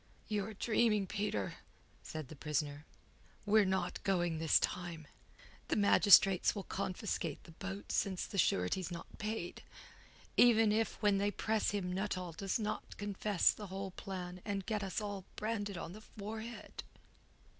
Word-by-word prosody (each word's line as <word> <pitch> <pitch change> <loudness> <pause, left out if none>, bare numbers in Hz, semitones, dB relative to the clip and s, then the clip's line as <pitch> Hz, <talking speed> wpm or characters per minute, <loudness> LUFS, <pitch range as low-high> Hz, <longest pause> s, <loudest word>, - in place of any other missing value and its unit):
"You're 210 0 -2
dreaming, 215 -1 +2
Peter," 190 - -2 0.4
said 155 -4 -6
the 155 - -8
prisoner. 150 0 -2 0.6
"We're 210 0 +5
not 185 -1 -1
going 175 -4 +1
this 160 -1 +5
time. 170 -3 -3 0.6
The - - +1
magistrates 200 -2 +6
will 200 - -4
confiscate 185 -5 -3
the - - -13
boat 195 +4 -6
since 190 -2 0
the 200 - -3
surety's 165 - +2
not 170 -1 -8
paid, 215 -4 -3 0.8
even 225 -3 +6
if 220 +1 0
when 205 -1 +4
they 200 +1 +2
press 215 +2 0
him 185 -3 -2
Nuttall 185 -2 -2
does 190 +4 -1
not 215 -2 -4
confess 205 -2 +2
the 210 - -8
whole 190 +1 -5
plan 180 -1 -6
and 200 -2 -3
get 215 -2 -1
us 195 +2 -2
all 200 -2 -4
branded 205 -3 -2
on 170 - -6
the 215 - -10
forehead." 220 +2 -7
195 Hz, 145 wpm, -35 LUFS, 180-210 Hz, 0.8 s, magistrates